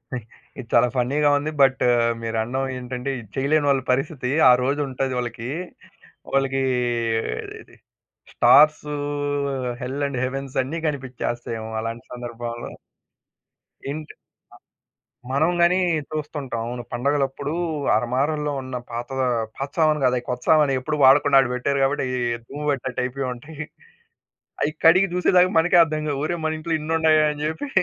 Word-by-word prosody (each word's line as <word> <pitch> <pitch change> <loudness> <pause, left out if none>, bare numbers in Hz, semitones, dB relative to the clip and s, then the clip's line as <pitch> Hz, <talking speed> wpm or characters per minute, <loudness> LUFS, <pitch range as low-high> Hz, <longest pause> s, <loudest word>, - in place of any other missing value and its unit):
అ! - - -1 0.4
ఇది 125 - -7
చాలా 120 +1 +5
ఫన్నీ‌గా 140 +4 +2
ఉంది. 150 +2 -3
బట్టు 135 -1 +4 0.4
మీరండం 115 +3 -2
ఏంటంటే 125 +1 -5
ఇది 115 - -12
చేయలేనోళ్ళ 140 0 +2
పరిస్థితి 135 0 -1 0.2
ఆ - - +9
రోజుంటది 135 -1 -1
వాళ్ళకి 120 -1 -5 0.9
వాళ్ళకి 135 0 +1 1.7
స్టార్స్ 150 +1 +5 1.0
హెల్ 135 +3 -3
అండ్ 140 -2 -4
హెవెన్స్ 135 +1 -5
అన్ని 155 +6 -4
కనిపించేస్తాయేమో 120 -5 -4
అలాంటి 115 +1 -5
సందర్భంలో. 120 -1 -6 1.2
ఏంటి? 155 +2 -6
అ - - -61 1.1
మనం 150 +5 +2
గాని 175 +2 +4 0.3
చూస్తుంటాం 145 -5 -4
అవును. 120 +1 -5
పండగలప్పుడు 140 +2 -1 0.4
అరమారల్లో 140 +6 0
ఉన్న 130 -1 -6
పాత 120 +1 -5 0.5
పాత 135 - -4
సామాను 155 -2 +3
కాదు 125 -1 +3
అది 120 - -3
కొత్త 125 -1 -3
సామానే 150 -3 +5
ఎప్పుడు 150 +4 -2
వాడకుండా 140 +1 +6
అక్కడ 130 -2 +3
పెట్టారు 140 +3 -1
కాబట్టి 135 +2 0
అయ్యి 125 0 -2 0.2
దుమ్ము 145 +5 -7
పట్టినట్టైపోయుంటయి. 130 +2 -4 1.0
అయి 150 - +1
కడిగి 185 +4 +6
చూసే 180 - +2
దాకా 180 +1 +5
మనకే 175 +2 +4
అర్థం 155 -1 -3
కావు. 140 -2 -2
ఒరేయ్ 170 +1 -2
మనింట్లో 155 +1 -2
ఇనున్నాయా 155 0 +3
అని 150 0 -7
చెప్పి. 160 - -4
135 Hz, 125 wpm, -23 LUFS, 125-150 Hz, 1.7 s, ఆ